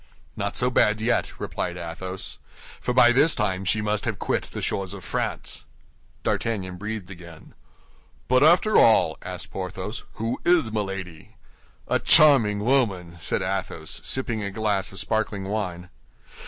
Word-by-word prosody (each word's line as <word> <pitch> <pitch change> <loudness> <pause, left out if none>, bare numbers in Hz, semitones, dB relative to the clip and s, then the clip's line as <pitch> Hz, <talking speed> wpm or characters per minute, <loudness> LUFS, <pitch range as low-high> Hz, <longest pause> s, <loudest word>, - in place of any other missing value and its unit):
"Not - - -2
so 125 +1 +2
bad 110 -3 +3
yet," 115 +2 0
replied 90 -1 -3
Athos; 90 +2 -6 0.4
"for - - -2
by 125 -1 +6
this 145 +6 +4
time 95 -3 -1
she 105 +3 +1
must 105 0 -1
have 110 -4 -2
quit - - -1
the - - -7
shores 95 0 -2
of 95 - -10
France." - - -3 0.6
D'Artagnan 95 -5 -2
breathed 105 -1 -5
again. 85 -3 -12 0.7
"But 130 0 +3
after 175 +7 +5
all," 110 -8 +5
asked - - -7
Porthos, - - -5
"who 115 +3 -3
is 170 -11 +3
Milady?" 95 -6 -5 0.5
"A - - +1
charming 115 -9 +5
woman!" 100 -10 +1
said 80 - -1
Athos, 95 0 -3
sipping 120 -4 0
a 100 - -2
glass 100 -1 -1
of 95 - -8
sparkling 110 -3 -1
wine. 90 -4 -4
105 Hz, 145 wpm, -24 LUFS, 95-115 Hz, 0.7 s, by